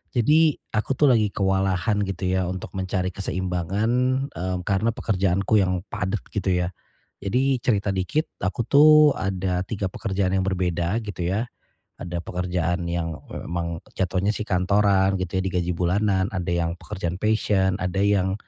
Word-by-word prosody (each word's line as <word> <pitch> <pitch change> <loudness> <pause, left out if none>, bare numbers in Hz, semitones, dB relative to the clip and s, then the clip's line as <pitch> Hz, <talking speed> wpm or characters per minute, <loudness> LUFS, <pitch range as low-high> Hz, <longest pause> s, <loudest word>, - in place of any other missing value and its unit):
Jadi, 150 +6 +4 0.2
aku 110 +5 0
tuh 145 -3 +5
lagi 110 -4 +3
kewalahan, 95 +1 +1
gitu 95 -2 -3
ya, 95 -1 +1
untuk 95 0 -6
mencari 95 -1 -2
keseimbangan, 95 +3 -2 0.4
mmm, 90 +2 -3
karena 100 +3 +1
pekerjaanku 100 +1 +1
yang 90 -1 0
padat, 95 +1 -2
gitu 100 -2 -1
ya. 85 - -3 0.5
Jadi 130 +7 +1
cerita 105 -4 0
dikit, 95 - -1
aku 100 +5 -1
tuh 145 +6 +6 0.3
ada 95 -1 -1
3 100 -3 -3
pekerjaan 95 -2 -1
yang 95 -1 +1
berbeda, 90 +1 0
gitu 100 -5 -6
ya. 100 +7 0 0.5
Ada 85 0 -4
pekerjaan 90 -1 -2
yang, 85 -2 -3
e - - -7
emang 85 -1 -3
jatuhnya 95 +2 0
sih 105 - -3
kantoran, 95 +1 +2
gitu 95 +1 -2
ya, - - 0
di 95 - -1
gaji 90 -1 0
bulanan. 95 +2 +1
Ada 90 -3 -3 0.2
yang - - -2
pekerjaan 90 -4 -4
passion, 105 -3 +2
ada 90 -1 -2
yang 100 -2 +2
95 Hz, 155 wpm, -24 LUFS, 90-105 Hz, 0.5 s, tuh